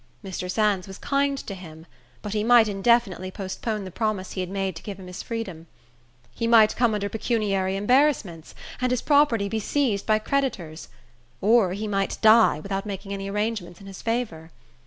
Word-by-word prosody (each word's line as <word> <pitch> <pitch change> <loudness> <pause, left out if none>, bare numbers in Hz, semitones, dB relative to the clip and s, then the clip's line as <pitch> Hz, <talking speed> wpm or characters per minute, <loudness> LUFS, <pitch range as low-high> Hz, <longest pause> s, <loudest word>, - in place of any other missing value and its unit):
Mr. 185 -1 -5
Sands 200 -2 +1
was 190 0 -9
kind 280 0 0
to 200 - -6
him; 165 -4 -11 0.4
but 210 - -4
he 210 -1 0
might 235 -1 +6
indefinitely 200 -2 +1
postpone 200 +3 -4
the 185 - -8
promise 215 -2 -2
he 185 - -3
had 180 - -4
made 195 -2 -2
to 160 - -8
give 200 -3 -7
him 190 - -11
his 180 0 -7
freedom. 190 -8 -6 0.7
He 230 - -2
might 225 -2 +6
come 235 -3 +2
under 200 -1 -2
pecuniary 200 -3 -1
embarrassments, 205 - +1 0.3
and 250 - +1
his 250 -1 -1
property 285 -9 +3
be 220 +2 -2
seized 220 -3 0
by 215 -1 +4
creditors; 215 - -3 0.5
or 210 -3 +3
he 210 +3 -4
might 195 -1 -1
die, 220 -7 +6
without 195 +2 -4
making 200 0 -5
any 195 0 -4
arrangements 210 -4 -3
in 200 - -13
his 195 -1 -10
favor. 225 -9 -3
205 Hz, 180 wpm, -25 LUFS, 190-230 Hz, 0.7 s, might